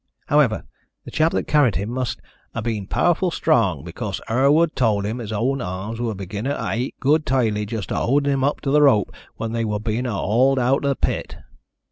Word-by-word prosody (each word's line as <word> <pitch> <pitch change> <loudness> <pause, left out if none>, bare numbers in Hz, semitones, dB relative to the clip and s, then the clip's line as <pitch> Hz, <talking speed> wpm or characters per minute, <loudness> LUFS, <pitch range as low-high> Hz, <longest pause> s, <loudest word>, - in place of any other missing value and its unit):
However, - - +3 0.4
the - - -9
chap 160 +1 +2
that - - 0
carried 145 - +3
him 100 +6 -2
must 125 -3 -3 0.3
'a' 115 - -3
been 110 -4 -3
powerful 175 - +2
strong, - - +1
because - - -5
Herward 145 +7 +3
told 110 -6 +1
him 110 +4 -3
his 110 -3 -6
own 125 +6 0
arms 100 +4 -5
were 115 -3 -2
begunnin' 100 +8 -4
ter - - -3
ache 125 +4 -2
good 150 +3 +3
tidily 110 -6 0
just 110 -3 -5
a - - -1
howdin' 140 +3 +2
him 135 -1 0
up 145 +2 0
to 135 - -1
the 150 +1 +5
rope 130 -8 +4 0.2
when 115 0 -4
they 115 0 -1
wor 105 -1 -1
being 115 +3 -2
a - - -2
hawled 125 +8 +2
out 130 +2 +2
the 140 -1 0
pit. - - -2
120 Hz, 205 wpm, -22 LUFS, 110-140 Hz, 0.4 s, the